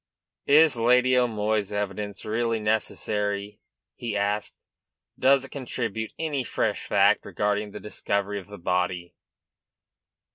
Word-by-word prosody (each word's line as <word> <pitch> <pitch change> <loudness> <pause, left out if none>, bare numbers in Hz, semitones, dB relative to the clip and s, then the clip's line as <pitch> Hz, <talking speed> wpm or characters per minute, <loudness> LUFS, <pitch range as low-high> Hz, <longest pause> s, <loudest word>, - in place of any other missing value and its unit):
"Is 150 0 +6
Lady 125 +2 +4
O'Moy's 110 -4 +1
evidence 100 0 -4
really 115 +1 0
necessary?" 105 -1 -1 0.3
he 115 -3 -4
asked. 100 +1 -1 0.6
"Does 135 +1 +4
it - - -14
contribute 115 -5 -4
any 150 -5 -1
fresh - - -2
fact - - +4
regarding 105 0 -1
the 105 +1 -8
discovery 100 -1 -2
of 95 - -13
the 100 0 -10
body?" 90 0 -1
105 Hz, 115 wpm, -26 LUFS, 100-120 Hz, 0.6 s, Is